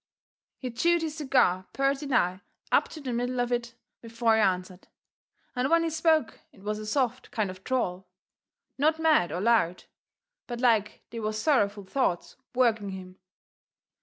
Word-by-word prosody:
He 255 -2 -5
chewed 340 +8 +2
his 315 -1 -4
cigar 250 - +2
purty 275 +1 0
nigh 185 -8 +1 0.3
up - - +4
to 310 - -10
the 255 -3 -4
middle 245 +1 -1
of 245 0 0
it 240 -1 -2 0.3
before 230 0 +1
he 220 - +3
answered, 185 -1 -1 0.7
and 250 +2 0
when 335 0 +4
he 330 - -1
spoke 320 -4 +1
it 195 - -19
was 210 +1 -2
a 215 - -7
soft 255 +1 -1
kind 210 -5 -1
of 185 - -11
a - - -22
drawl 190 -6 -2 0.7
not 310 +3 +3
mad 315 - +3
or 175 - -3
loud 200 -5 +2 0.6
but 240 -1 -5
like 220 -4 +1
they 230 - -5
was 215 0 -2
sorrowful 210 -7 +1
thoughts 190 -5 -1 0.2
working 225 -5 +2
in 195 - -5
him. 185 0 -12
235 Hz, 170 wpm, -28 LUFS, 200-270 Hz, 0.7 s, up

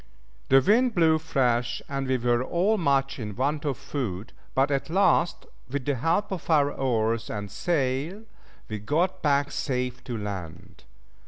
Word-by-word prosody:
The 135 0 +7
wind 230 - +3
blew 160 -2 +4
fresh, 125 -6 0
and 135 -1 -3
we 130 0 +2
were 120 0 +1
all 180 +9 +1
much 135 -4 +1
in 105 -3 -5
want 145 +4 -1
of 140 -3 -1
food, 110 -8 -5 0.2
but 135 +2 +3
at 140 +2 -1
last, 175 -1 +2 0.2
with 135 -1 -3
the 145 - +1
help 165 - 0
of 185 -3 -5
our 145 -3 +4
oars 115 -4 0
and 105 -1 -5
sail, 155 +4 -1 0.4
we 110 -1 -4
got 170 - 0
back 145 -1 +2
safe 125 -2 -2
to 120 -3 -4
land. 95 -5 -7
135 Hz, 160 wpm, -26 LUFS, 120-160 Hz, 0.4 s, The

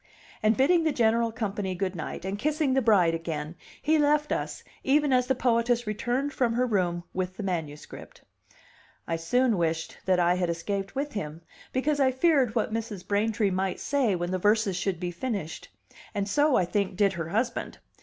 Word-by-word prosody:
And 215 0 +3
bidding 330 +6 +4
the 315 - +2
general 230 -2 +2
company 205 -4 -3
good 185 0 -2
night, 165 +2 -6
and 195 +2 -3
kissing 300 +1 +1
the 265 - +3
bride 195 -8 +4
again, 160 -2 -4 0.3
he 310 +1 +3
left 295 0 +2
us - - -3 0.2
even 290 0 +3
as 250 -1 +3
the 265 - +2
poetess 240 -1 +1
returned 245 +7 -1
from 240 -3 +1
her 250 +2 +2
room 180 -6 0
with 185 +1 -3
the 210 - -4
manuscript. 160 -6 -6 0.8
I 165 - 0
soon 230 +5 +2
wished 165 -1 -2
that 185 -1 +3
I 175 0 +4
had 180 -1 0
escaped 195 +4 -3
with 285 +2 -2
him, 160 -5 -5 0.3
because 285 +3 0
I 265 -1 +4
feared 260 -4 +2
what 220 -1 0
Mrs. 220 -4 -4
Braintree 210 0 +1
might 190 0 -1
say 265 -8 +1
when 175 0 -3
the 185 - -1
verses 210 0 +2
should 180 -1 -2
be 175 0 -3
finished; 185 -4 -4 0.5
and 200 -1 -1
so, 290 +6 +3
I 180 - +3
think, 190 +1 -1
did 200 -2 +3
her 165 -2 -4
husband. 235 +5 -2
210 Hz, 185 wpm, -27 LUFS, 180-255 Hz, 0.8 s, bidding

